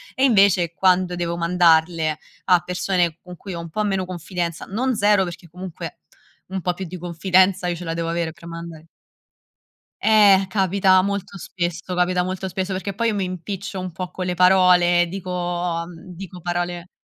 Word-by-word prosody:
E 260 - 0
invece 195 -8 +4
quando 180 +1 +2
devo 170 -1 -2
mandarle 165 -2 +3 0.3
a 180 -2 +5
persone 180 -2 -1
con 180 0 -11
cui 195 +2 -8
ho 170 - -5
un 170 -1 -7
po' 215 +6 -2
meno 195 -2 -1
confidenza, 175 -1 -4
non 245 +5 -1
0 205 -1 +3
perché 175 -1 -7
comunque 180 0 -8 0.5
un 190 0 -4
po' 180 0 0
più 190 +1 -6
di 180 +2 -7
confidenza 180 +2 +2
io 175 - -1
ce 175 - -8
la 165 - -2
devo 165 0 -2
avere 170 -1 -1
per 170 +1 -14
mandare 165 -1 -9 1.1
Eh 205 -3 +6
capita 190 -1 +3
molto 200 0 -3
spesso, 175 0 -4
capita 180 0 +1
molto 185 +1 -4
spesso, 190 +1 -3
perché 190 +1 -4
poi 230 +3 0
io 215 - -1
mi 195 - -1
impiccio 185 +2 -5
un 185 -1 -5
po' 180 +2 -6
con 185 - -4
le 180 - -1
parole, 180 -1 +5
dico 185 0 -6
mhmm, 175 0 -3
dico 180 -1 -9
parole 175 0 -3
180 Hz, 180 wpm, -22 LUFS, 170-190 Hz, 1.1 s, Eh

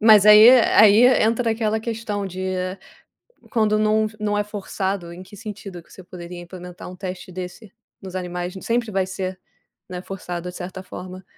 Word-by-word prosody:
Mas 215 -2 +7
aí 210 +2 +10
e 255 -1 +8
aí 215 +2 +6 0.2
entra 230 +1 +1
aquela 220 -1 0
questão 220 -3 -4
de 185 0 -7 1.1
quando 215 -3 +2
não 215 0 +2
não 210 -1 -1
é 205 - +1
forçado 195 -3 -4
em 180 - -10
que 205 +2 -14
sentido 200 -4 -8
que - - -25
você 185 - -12
poderia 175 0 -9
implementar 180 0 -10
um 180 - -10
teste 185 -1 -7
desse 185 +3 -8 0.3
nos 190 -1 -9
animais, 180 0 -4
sempre 235 -1 -1
vai 190 -1 0
ser, 190 0 -5 0.5
né, 180 -1 -6
forçado 180 -2 -6
de 180 - -10
certa 185 +1 -7
forma. 185 0 -9
195 Hz, 175 wpm, -22 LUFS, 180-215 Hz, 1.1 s, aí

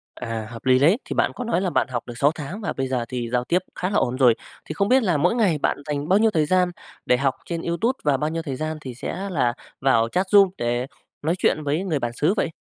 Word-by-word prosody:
À, 110 -1 -5
hợp 115 0 -10
lý 130 0 +5
đấy. 160 - +5
Thì - - -4
bạn - - +1
có 250 - -4
nói 230 -6 0
là 190 - 0
bạn - - +1
học 125 -3 -3
được 120 - -6
6 145 +3 +4
tháng 170 +8 -6
và 205 - -2
bây 135 -1 -2
giờ 125 -2 -1
thì 120 -2 -3
giao 125 +1 0
tiếp 175 +8 +1 0.2
khá 185 - -2
là 205 - +1
ổn 125 -8 +1
rồi, 125 -4 +5 0.3
thì - - -5
không 200 +5 0
biết 255 +1 +4
là 175 -7 +2
mỗi 180 +10 +2
ngày 200 -9 +2
bạn - - 0
dành 145 -1 -3
bao 195 +3 +5
nhiêu 220 0 +4
thời 155 -5 +2
gian 180 +1 +2 0.3
để 125 - +3
học 135 0 +1
trên 170 -1 -3
YouTube 220 +11 -1
và 145 -3 +2
bao 150 +3 -1
nhiêu 165 +1 -3
thời 140 -5 -4
gian 155 +3 -3
thì 130 -4 -7
sẽ 195 +9 -5
là 130 -9 +1 0.3
vào 115 -4 +3
chat 185 +8 0
room 200 -2 +6
để 120 +2 -1 0.3
nói 165 +4 0
chuyện 155 -3 +1
với 150 +5 0
người 160 -7 -1
bản 120 -1 -3
xứ 155 +9 +1
vậy? 170 - +1
150 Hz, 280 wpm, -23 LUFS, 130-185 Hz, 0.3 s, room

